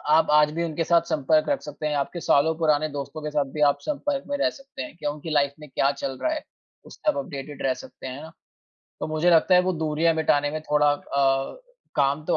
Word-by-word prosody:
आप 160 0 +4
आज 150 0 +5
भी 170 +1 -2
उनके 165 0 -2
साथ 170 0 +4
संपर्क 155 +1 +2
रख 285 -2 +1
सकते 150 +1 -6
हैं। 150 - 0
आपके 155 +5 -2
सालों 160 +2 +3
पुराने 155 -1 +2
दोस्तों 145 +2 -6
के 150 - -3
साथ 145 -1 +1
भी - - -2
आप 140 - -3
संपर्क 290 -1 -2
में 285 - -1
रह - - +2
सकते 275 - -9
हैं 125 - -9
कि 155 - -7
उनकी 150 +2 -4
लाइफ़ 140 -2 +2
में 150 - -11
क्या 135 +1 +2
चल 135 -1 -5
रहा 315 - +1
है, 305 - -5 0.4
उससे - - -7
आप 290 - -6
अपडेटेड 145 - -6
रह 130 - +2
सकते 130 +1 -11
हैं। 145 +5 -7 0.7
तो - - -2
मुझे 155 +3 +2
लगता 170 +2 +5
है 180 - +7
वो 185 - 0
दूरियाँ 160 0 +1
मिटाने 145 -2 +2
में 155 +1 -4
थोड़ा 150 -1 +3
अ, 135 -1 0 0.4
काम 145 +2 +1
तो - - +2
150 Hz, 235 wpm, -25 LUFS, 145-165 Hz, 0.7 s, है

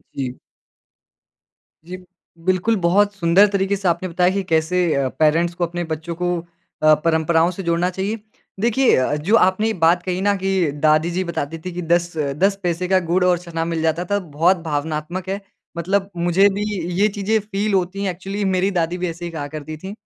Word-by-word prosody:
जी। 130 -2 -4 1.5
जी, 180 +1 -7 0.5
बिल्कुल 185 +5 +2
बहुत 200 +4 +3
सुंदर 185 +2 +5
तरीके 200 0 0
से 195 -2 -3
आपने 185 +2 0
बताया 180 +1 +2
कि 195 0 -1
कैसे 170 0 +1
अ, 140 -1 +1
पेरेंट्स 165 +3 +3
को 175 - 0
अपने 175 +1 -4
बच्चों 160 +1 -5
को 180 +1 -1 0.5
अ, 155 0 +7
परंपराओं 165 +1 +2
से 190 +2 -7
जोड़ना 170 +1 +1
चाहिए। 195 +4 -3 0.4
देखिए 240 +4 +3
अ 130 - +2
अ, - - +1
जो 170 +10 +1
आपने 190 +1 +3
ये 225 - 0
बात 175 0 +2
कही 185 0 -2
ना 205 0 +2
कि 190 -4 0
दादी 155 +3 +2
जी 185 +2 -1
बताती 165 -2 -4
थी 180 - -3
कि 180 - -4
10-10 170 +1 0
पैसे 175 +1 -1
का 190 0 +3
गुड़ 180 +2 +2
और 180 -1 +3
चना 165 -2 -4
मिल 165 -1 -2
जाता 165 +2 0
था 205 - +2
बहुत 170 +1 +1
भावनात्मक 160 +4 -3
है 195 +1 -3 0.4
मतलब 195 +3 0
मुझे 175 +3 +4
भी 200 +1 -3 0.4
ये 210 - +5
चीज़ें 210 +1 0
फील 205 0 -2
होती 190 +1 0
हैं। 190 - 0
एक्चुअली 195 +3 -5
मेरी 190 +1 +1
दादी 175 -1 -1
भी 180 0 -2
ऐसे 170 +1 -7
ही 170 - -5
कहा 150 -3 -5
करती 155 +1 -7
थी। 190 +5 -8
180 Hz, 195 wpm, -20 LUFS, 165-195 Hz, 1.5 s, अ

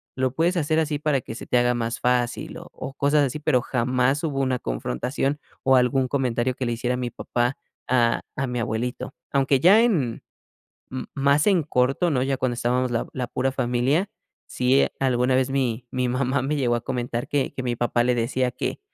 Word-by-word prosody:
lo 130 -1 0
puedes 170 +5 +1
hacer 155 0 +1
así 155 -2 0
para 145 -3 0
que 115 - -8
se - - -8
te 125 - +2
haga 120 0 +2
más 115 0 -2
fácil", 125 -1 0
o - - -10
o 135 - -7
cosas 145 +1 +3
así, 130 - -5
pero 145 -5 +2
jamás 125 +5 0
hubo 140 -4 -1
una 130 -2 +1
confrontación 130 - -2 0.2
o 135 0 +5
algún 130 +1 +3
comentario 125 -2 0
que 130 - -3
le 120 - -1
hiciera 125 +2 -1
mi 125 -1 -3
papá 120 +2 -1 0.3
a 120 -2 +2
a 135 -2 -1
mi 125 -1 -3
abuelito. 120 +3 -3 0.2
Aunque 135 -1 +2
ya 195 - +6
en 150 - 0 0.7
m 130 -1 -5
más 140 +2 +3
en 185 -5 +3
corto, 135 +5 +1
¿no? 130 -3 +1
Ya 135 +1 0
cuando 130 -2 -1
estábamos 125 +1 0
la 115 - -1
la 125 -1 -3
pura 130 +2 -1
familia, 130 +8 +1 0.4
sí, 125 +2 +2
alguna 130 -1 +2
vez 130 0 +2
mi 125 -3 -1
mi 125 -1 -1
mamá 130 +1 0
me 150 +3 -1
llegó 120 -4 +1
a - - -3
comentar 120 -2 -3
que 145 -2 0
que 130 - -5
mi 120 -1 0
papá 120 0 +1
le 125 - +2
decía 125 +2 0
que, 125 - -4
130 Hz, 205 wpm, -24 LUFS, 120-140 Hz, 0.7 s, ya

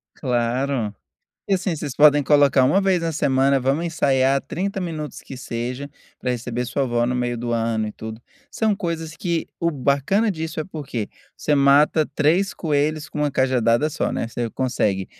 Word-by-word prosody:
Claro. 120 -2 -1 0.5
E, 195 - +2
assim, 185 -2 -1
vocês 145 -3 -5
podem 145 0 +6
colocar 140 -2 +4
1 150 +10 +3
vez 190 -3 +1
na 165 -1 -1
semana: 135 -1 +2
"Vamos 140 +6 0
ensaiar 135 -4 +2
30 195 +6 -3
minutos, 160 -4 -5
que 135 - -10
seja, 125 +3 -5 0.3
pra 125 - -2
receber 120 0 -3
sua 135 +2 -1
vó 120 -1 +1
no 125 +1 0
meio 120 -1 -1
do 120 0 -3
ano 115 -1 0
e - - -7
tudo". 110 +1 -8 0.3
São 220 -2 +1
coisas 165 -4 -4
que 170 -4 -2
o 170 - +2
bacana 145 - +1
disso 160 -3 -5
é - - -3
porque 140 - -5 0.3
você 150 - 0
mata 145 +2 +4
3 170 +7 +2
coelhos 155 0 -1
com 150 - -7
uma 150 -1 +1
cajadada 130 +1 +2
só, - - -1
né. - - -2
Você 115 0 -3
consegue 105 -8 -1
140 Hz, 180 wpm, -22 LUFS, 125-160 Hz, 0.5 s, podem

